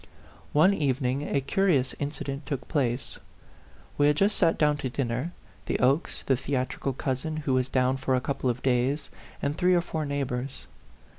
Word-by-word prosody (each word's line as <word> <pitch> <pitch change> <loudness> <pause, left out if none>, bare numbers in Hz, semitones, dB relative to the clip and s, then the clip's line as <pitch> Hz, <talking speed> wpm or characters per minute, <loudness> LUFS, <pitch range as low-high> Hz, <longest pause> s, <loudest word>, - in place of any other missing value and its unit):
One 165 +7 +5
evening 135 -3 0
a 140 - +1
curious 150 -4 +2
incident 140 -1 -4
took 140 -3 -3
place. 130 -5 -1 0.8
We 145 - +5
had 150 - +4
just 200 +6 +3
sat 165 - +3
down 150 -1 +3
to 130 - -3
dinner, 125 +5 -2 0.4
the - - +1
Okes, 135 +6 +1
the 135 - +2
theatrical 130 +1 -2
cousin, 135 +4 -2
who 145 -3 -1
was 130 0 +1
down 130 0 +2
for 130 0 +1
a - - +2
couple 130 0 -1
of 120 +1 -2
days, 130 +3 +1 0.3
and 140 +1 0
three 180 +2 +3
or 175 - +4
four 160 -3 -3
neighbors. 135 - -3
140 Hz, 170 wpm, -27 LUFS, 130-150 Hz, 0.8 s, One